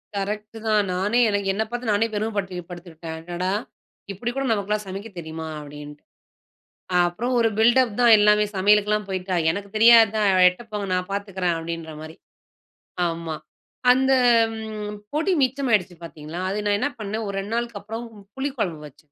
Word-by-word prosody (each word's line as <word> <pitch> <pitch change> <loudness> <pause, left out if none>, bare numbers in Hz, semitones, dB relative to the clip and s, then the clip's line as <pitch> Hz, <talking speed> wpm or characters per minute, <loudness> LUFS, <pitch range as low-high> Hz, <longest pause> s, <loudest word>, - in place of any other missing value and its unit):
Correct 210 +2 -4
தான். 215 -1 +3
நானே 205 +6 +1 0.3
என்னப் 220 +2 -2
பாத்து 245 0 -4
நானே 210 +2 +2
பெருமப்படு 205 -3 -2
படுத்திட்டேன். 170 -2 -8
"அடடா! 175 +3 -3 0.6
இப்படி 235 +5 -4
கூட 275 - -1
நமக்குலாம் 210 0 -1
சமைக்க 195 +4 -6
தெரியுமா?" 160 0 -6
அப்படின்னுட்டு. 150 0 -10 1.0
அப்புறம் 235 +9 -3
ஒரு 230 -1 +3
பில்டப் 235 +1 +4
தான் 235 -2 +7
எல்லாமே 210 0 +4
சமையலுக்குலாம் 210 +2 +3
போய்ட்டா 185 -1 -2 0.2
எனக்கு 200 +3 -6
தெரியாத? 225 -1 +7 0.3
எட்ட 180 +4 0
போங்க 205 -1 -3
நான் 180 +1 -1
பாத்துக்குறேன். 195 -3 -1
அப்படின்ற 165 -1 -6
மாரி. 155 +1 -9 0.9
ஆமா. 165 -2 -3 0.6
அந்த 265 +1 +3 1.0
பொடி 325 +6 +1
மிச்சமாகிடுச்சு 245 -9 +1
பாத்தீங்களா, 160 0 -8
அது 195 - -2
நான் 205 0 +2
என்ன 285 - 0
பண்ணேன் 215 +1 -4
ஒரு 200 - -4
2 200 +3 -5
நாளுக்கு 235 -3 -3
அப்புறம் 225 +3 -6 0.3
புளிக்குழம்பு 255 - -3
வச்சேன். 145 +1 -22
205 Hz, 140 wpm, -23 LUFS, 175-225 Hz, 1.0 s, தான்